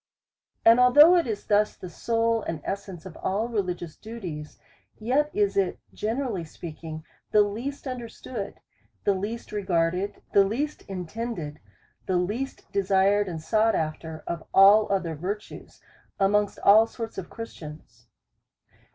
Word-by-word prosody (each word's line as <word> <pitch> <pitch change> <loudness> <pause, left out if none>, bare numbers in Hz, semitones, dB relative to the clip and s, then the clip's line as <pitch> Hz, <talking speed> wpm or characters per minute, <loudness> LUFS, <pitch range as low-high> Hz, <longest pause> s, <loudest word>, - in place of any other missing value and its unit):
And 230 +2 +8
although 290 +8 +8
it 340 -5 +2
is 215 -3 -4
thus 210 0 +2
the 185 - -9
soul 230 +5 0
and 165 -5 -4
essence 195 -3 -5
of 180 -4 -9
all 210 +4 -1
religious 180 -7 -3
duties, 180 -10 -8 0.4
yet 265 +7 +1
is 205 -1 +1
it, 195 -2 +1 0.2
generally 225 -4 -2
speaking, 160 -1 -8 0.3
the 210 - +5
least 235 +9 -5
understood, 240 -4 -6 0.4
the 200 - +3
least 210 +5 -5
regarded, 185 -1 -1
the 200 - +7
least 260 +10 -2
intended, 180 -4 -5 0.5
the 185 - +2
least 215 +10 -3
desired, 200 +1 +3
and 170 -3 -4
sought 220 +3 +2
after, 160 0 -4
of 170 -1 -4
all 200 +2 +7
other 185 -4 0
virtues, 195 +7 -6 0.4
amongst 205 +1 +2
all 215 +3 +7
sorts 225 -3 -6
of 180 - -8
Christians. 150 - -10
200 Hz, 135 wpm, -26 LUFS, 175-225 Hz, 0.5 s, And